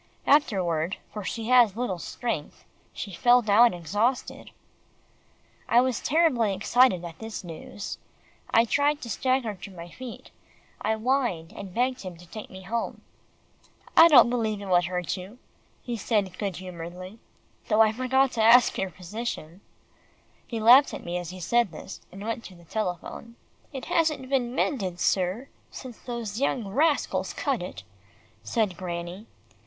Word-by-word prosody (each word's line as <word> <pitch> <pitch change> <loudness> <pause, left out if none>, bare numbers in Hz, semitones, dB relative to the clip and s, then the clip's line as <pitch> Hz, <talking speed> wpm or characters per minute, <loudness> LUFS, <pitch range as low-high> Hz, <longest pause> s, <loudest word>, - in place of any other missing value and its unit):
Afterward, 185 - +2 0.2
for 210 -1 -5
she 225 +4 -4
has 240 -6 +6
little 230 -7 -2
strength, 225 -6 -5 0.3
she 200 - -7
fell 245 +7 +4
down 225 +3 +6
exhausted." 205 - -2 1.2
I 235 - +6
was 255 -2 0
terribly 255 - +2
excited 205 -2 +3
at 165 -1 -9
this 225 -2 -6
news. 175 +3 -7 0.5
I 230 - +4
tried 290 +4 +2
to 235 - -6
stagger 255 -2 0
to 195 0 -10
my 175 -2 -10
feet. 255 -3 -10 0.5
I 220 +1 +1
whined, 220 -8 -1
and 195 -2 -8
begged 250 +1 0
him 185 -3 -8
to 175 - -14
take 210 +5 -9
me 190 0 -11
home. 230 +5 -3 0.9
"I 330 - +10
don't 245 -7 +7
believe 220 -4 -1
it 200 - -7
would 180 -2 +3
hurt 180 +1 -2
you," 190 +6 -10 0.5
he 240 - -3
said 205 -4 -1
good 200 -4 -2
humouredly, 180 +3 -8 0.5
"though 215 0 +4
I 220 -1 +5
forgot 255 +3 +2
to 225 - -1
ask 235 +2 +6
your 190 - -1
physician." 180 -1 -6 0.9
He 230 - -4
laughed 245 +6 +7
at - - -9
me 175 +1 -2
as 175 -2 -6
he 185 0 -8
said 235 +3 +1
this, 155 - -9
and 195 +2 -9
went 230 +1 -3
to 185 - -11
the 170 -1 -17
telephone. 215 +4 -5 0.4
"It 265 -3 -6
hasn't 315 -6 0
been 255 -2 0
mended, 190 -14 -1
sir, 190 +8 0 0.2
since 250 -4 -10
those 235 -2 -5
young 245 -6 0
rascals 295 +7 +1
cut - - -1
it," - - -7 0.6
said 215 -6 -1
Granny. 175 +3 -6
220 Hz, 155 wpm, -26 LUFS, 185-245 Hz, 1.2 s, I